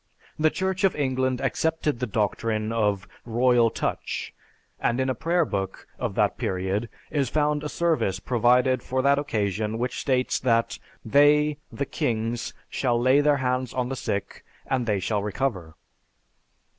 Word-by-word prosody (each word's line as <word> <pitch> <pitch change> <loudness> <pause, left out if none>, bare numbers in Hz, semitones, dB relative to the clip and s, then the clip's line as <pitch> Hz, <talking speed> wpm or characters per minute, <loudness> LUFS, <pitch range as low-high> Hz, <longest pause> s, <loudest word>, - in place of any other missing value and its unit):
The 155 +1 +4
Church 190 +3 -2
of 195 - +3
England 130 -3 0
accepted 160 -5 0
the 125 - -1
doctrine 110 +1 -1
of 105 -2 0 0.2
"royal 120 0 +3
touch," - - -3 0.5
and 120 +2 0
in 130 0 +1
a - - 0
prayer 170 +7 +1
book 95 -5 -4
of - - -2
that - - +1
period 95 +4 -1 0.2
is 140 -3 0
found 150 -1 +1
a 150 - -3
service 155 - 0
provided 125 +3 +3
for 130 +2 -1
that 140 +1 +4
occasion 110 -5 -1
which 125 +2 -2
states 130 -2 +1
that 115 -2 +1 0.3
"They 145 +4 +4
(the 140 - -3
kings), 115 -1 -2 0.2
shall 120 -3 0
lay 130 +4 +4
their 145 -1 +3
hands 130 -1 -1
on 125 -1 -1
the 135 - -2
sick, 100 -5 -4 0.2
and 125 -3 -1
they 105 -3 +1
shall 100 +2 -1
recover." 100 -6 -2
125 Hz, 155 wpm, -25 LUFS, 110-140 Hz, 0.5 s, The